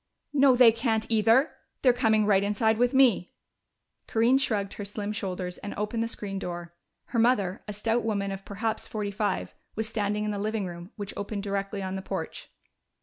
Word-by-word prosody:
"No, 275 -2 +6
they 245 -2 +8
can't, 225 -1 0
either! 225 +6 +4 0.3
They're 250 -2 +6
coming 220 -3 +3
right 200 -2 +4
inside 215 +2 +1
with 245 0 +3
me!" 255 -9 +3 0.7
Corinne 235 +3 +3
shrugged 205 -7 0
her 205 - -6
slim 205 +1 -4
shoulders 185 -3 -4
and 205 - -6
opened 210 +3 -2
the 230 - 0
screen 200 -3 -4
door. 175 -2 -6 0.4
Her 235 - 0
mother, 210 -5 +2
a 210 - -4
stout 225 +3 +1
woman 200 -3 -1
of 195 0 -6
perhaps 220 +3 -3
forty 210 -2 -3
five, 205 0 -2 0.2
was 220 0 -2
standing 210 -1 -1
in 210 - -1
the 205 - -3
living 215 0 -1
room, 175 0 -8
which 205 -2 -6
opened 200 0 -4
directly 200 0 -2
on 190 0 -3
the 190 - -3
porch. - - -5
210 Hz, 190 wpm, -27 LUFS, 200-225 Hz, 0.7 s, they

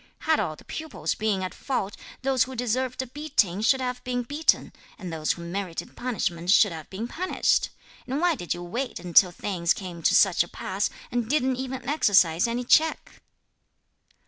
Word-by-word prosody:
Had 315 -1 +2
all 155 - -1
the - - -17
pupils 315 -2 -4
been 210 -3 -1
at 185 - -4
fault, 205 -7 -3 0.3
those 260 -3 +3
who 260 0 -8
deserved 250 +2 -1
a - - -7
beating 235 - 0
should 265 +4 +3
have 250 -1 -3
been 245 -1 -2
beaten, 290 +6 +1 0.2
and 180 -4 -7
those 155 -1 0
who 170 - -9
merited 175 0 -5
punishment 180 -8 -2
should 205 0 +6
have 160 -2 -8
been 210 +5 -5
punished! 365 +9 +1 0.4
and 265 +3 -1
why 350 0 +3
did 175 - -7
you 175 - -1
wait 240 +8 -4
until 180 +1 +5
things 175 -1 -1
came 180 -4 -7
to - - +3
such 190 -4 +5
a - - -11
pass, 190 +3 -2 0.2
and 240 -2 -1
didn't 265 -3 +1
even 260 -1 -5
exercise 195 - +4
any 240 +2 -2
check?" 315 +6 +2
230 Hz, 180 wpm, -26 LUFS, 180-260 Hz, 0.4 s, should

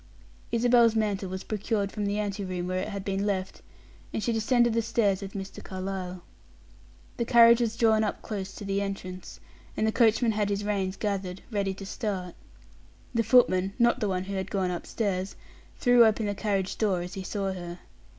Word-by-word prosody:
Isabel's 235 -1 +4
mantle 205 -3 0
was 190 0 -5
procured 210 -1 -2
from 210 -2 -2
the 205 +1 -1
ante 205 -1 -2
room 180 -2 -3
where 185 0 -1
it - - -3
had 200 -2 -5
been 195 0 -1
left, 190 -2 -2 0.5
and 215 - -3
she 235 - +1
descended 235 +1 +3
the 230 - +2
stairs 205 -3 +1
with 195 0 -7
Mr. 195 -1 -7
Carlyle. 185 -1 -5 0.9
The 235 - 0
carriage 235 0 +7
was 225 -2 0
drawn 220 -2 +4
up 210 - -3
close 195 -3 -4
to 205 - -7
the 195 0 0
entrance, 185 -2 -6 0.4
and 215 - +1
the 220 - +2
coachman 230 0 +3
had 210 -1 0
his 200 0 -1
reins 195 -2 -1
gathered, 195 -3 -3
ready 200 -2 -1
to 195 - -8
start. 190 -3 -4 0.8
The 230 - +2
footman 195 -6 +4
not 240 +1 +3
the 210 -4 0
one 185 -1 -1
who 200 +1 -6
had 190 0 -3
gone 190 -3 0
upstairs 190 +1 -2 0.4
threw 245 -1 +6
open 220 -1 +3
the 205 - -1
carriage 195 -2 -2
door 195 -5 +1
as 180 +1 -7
he 195 - -5
saw 195 0 -2
her. 175 -1 -7
200 Hz, 190 wpm, -28 LUFS, 190-220 Hz, 0.9 s, carriage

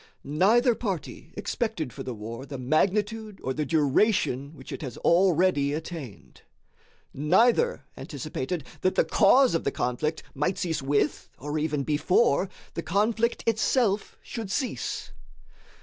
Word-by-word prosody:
Neither 215 - +3
party 200 -7 -5
expected 215 - -2
for - - -8
the 125 - -5
war 115 +5 -7
the 140 - -6
magnitude 205 - 0
or 130 - -1
the 150 +1 -2
duration 145 - +2
which - - -11
it - - -6
has 130 -6 -6
already 170 -5 +3
attained. 140 - -7 0.7
Neither 230 - +3
anticipated 150 +2 -4 0.2
that 185 - +1
the - - +3
cause 250 +5 +5
of 165 - 0
the - - +1
conflict 140 +5 -2
might 150 +7 -1
cease 165 -4 -1
with, 140 +2 0
or 145 +2 -3
even 150 -2 -1
before, 155 - +2 0.2
the - - -3
conflict 215 +7 0
itself 220 -2 +1
should 225 -4 -6
cease. 255 +6 -3
165 Hz, 135 wpm, -27 LUFS, 140-210 Hz, 0.7 s, cause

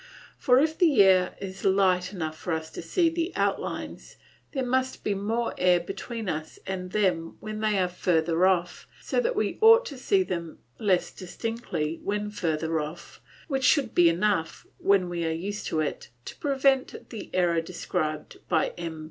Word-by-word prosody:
For 250 -1 +4
if 315 +2 +1
the 300 - +6
air 185 -1 +4
is 190 -1 -7
light 190 -2 +2
enough 160 -5 -4
for 170 +2 -4
us 160 0 -4
to - - -7
see 335 - +1
the 335 +2 -1
outlines - - -3 0.4
there 265 -3 -2
must 260 +1 -1
be 205 - 0
more 225 +4 -1
air 180 -1 +4
between 225 +5 -6
us 155 -2 -4
and 185 -1 -4
them 180 -6 0
when 215 0 -6
they 215 -1 +1
are 185 -1 +2
further 175 -1 +2
off, 180 -2 0
so - - -1
that - - 0
we - - -1
ought 455 +2 +7
to 280 -4 -7
see 380 +8 +2
them 170 - -5 0.2
less 190 -4 +1
distinctly 180 -4 -4
when 210 +1 -2
further 160 -4 -1
off, 155 +3 -7 0.3
which 270 -4 -1
should 270 -3 +3
be 175 -1 +6
enough, 175 -1 0
when 195 -2 +3
we 175 -1 -3
are 165 - 0
used 195 +6 -4
to 155 - 0
it, 155 - -4 0.2
to - - -7
prevent 270 -2 0
the 220 -4 -7
error 170 -2 +2
described 160 -2 -4
by 160 -3 +2
M. 165 -2 -5
190 Hz, 175 wpm, -27 LUFS, 170-235 Hz, 0.4 s, ought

